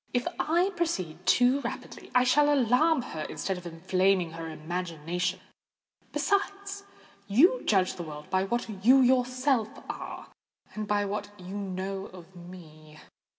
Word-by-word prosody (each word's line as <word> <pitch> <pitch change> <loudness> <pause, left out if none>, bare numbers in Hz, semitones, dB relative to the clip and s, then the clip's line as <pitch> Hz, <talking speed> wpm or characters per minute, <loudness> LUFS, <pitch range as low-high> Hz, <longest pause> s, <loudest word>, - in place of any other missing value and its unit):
"If 245 - +1
I 350 +5 +2
proceed 185 - -2
too 250 +3 +4
rapidly, - - -7
I 250 - +6
shall 290 +3 +4
alarm 275 +3 +3
her, 160 -10 -6
instead 190 -2 -3
of 175 - -9
inflaming 185 +1 +1
her 165 0 -6
imagination. 175 +2 -3 0.7
Besides, 400 0 -1 0.4
you 335 - +5
judge 190 -3 +3
the - - -7
world 150 -2 -9
by 190 0 +2
what 215 -3 -3
you 260 +4 +7
yourself 255 -1 +2 0.2
are, - - -8 0.4
and 215 -1 -4
by 205 0 +1
what 205 +1 -3
you 185 +2 -8
know 195 0 -4
of 185 0 -14
me. 160 -4 -13
195 Hz, 140 wpm, -28 LUFS, 180-255 Hz, 0.7 s, you